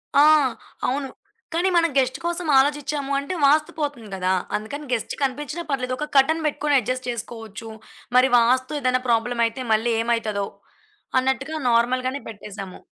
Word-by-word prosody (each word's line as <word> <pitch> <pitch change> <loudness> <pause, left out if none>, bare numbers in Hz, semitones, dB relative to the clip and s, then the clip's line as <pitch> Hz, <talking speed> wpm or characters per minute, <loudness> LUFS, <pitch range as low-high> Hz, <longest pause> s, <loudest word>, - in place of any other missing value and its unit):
ఆ! 285 - +7 0.6
అవును. 270 +1 -1 0.4
కాని 345 +3 +2
మనం 335 -1 +4
గెస్ట్ 260 -1 +2
కోసం 345 0 -2
ఆలోచిచ్చాము 285 0 +1
అంటే 280 +6 -4
వాస్తు 300 +2 +4
పోతుంది 285 -8 -3
గదా. 185 0 0 0.2
అందుకని 285 +8 -5
గెస్ట్ 230 - -2
కనిపించినా 295 +5 -2
పర్లేదు. 255 -2 -1
ఒక 300 - -3
కర్టెన్ 315 +4 +4
పెట్టుకొని 295 -1 +1
అడ్జస్ట్ 255 +2 -3
చేసుకోవచ్చు. 225 -2 -7 0.5
మరి 255 +1 +5
వాస్తు 255 +5 +2
ఏదైనా 255 -2 +1
ప్రాబ్లమయితే 235 +1 +1
మళ్ళీ 225 +2 +1
ఏమైతదో, 225 -3 -1 0.7
అన్నట్టుగా 265 +4 -1
నార్మల్ 240 +2 +2
గానే 275 +2 -3
పెట్టేసాము. 200 -3 -9
255 Hz, 140 wpm, -23 LUFS, 230-290 Hz, 0.7 s, ఆ